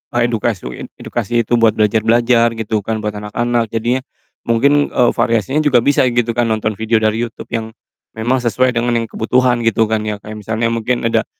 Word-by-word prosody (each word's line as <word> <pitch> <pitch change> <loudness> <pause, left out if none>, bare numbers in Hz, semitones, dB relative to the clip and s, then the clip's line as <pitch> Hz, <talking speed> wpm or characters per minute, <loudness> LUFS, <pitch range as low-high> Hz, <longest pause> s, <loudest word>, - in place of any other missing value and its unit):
a - - +2
edukasi 115 -4 -1 0.2
it - - -11
edukasi 120 +1 -1
itu 120 +2 +1
buat 115 -1 +4
belajar-belajar 115 +2 +2
gitu 110 -1 -2
kan 110 -1 -2
buat 105 0 -3
anak-anak 115 +3 -1
jadinya, 120 +3 0 0.4
mungkin, 140 +5 +2
eee, 120 -1 +3
variasinya 115 +3 +1
juga 125 -5 +4
bisa 140 0 +3
gitu 120 -1 0
kan 120 - +2
nonton 110 -2 -1
video 110 0 +1
dari 110 +2 +1
YouTube 115 - -11
yang, 110 -1 -4 0.4
memang 120 +4 0
sesuai 125 +1 +1
dengan 120 0 0
yang 115 -1 -1
kebutuhan 125 +1 +1
gitu 115 0 +3
kan 110 - +2
ya, 105 - -2
kayak 110 0 -8
misalnya 110 +3 -1
mungkin 115 +2 -1
ada, - - +1
115 Hz, 190 wpm, -17 LUFS, 110-120 Hz, 0.4 s, buat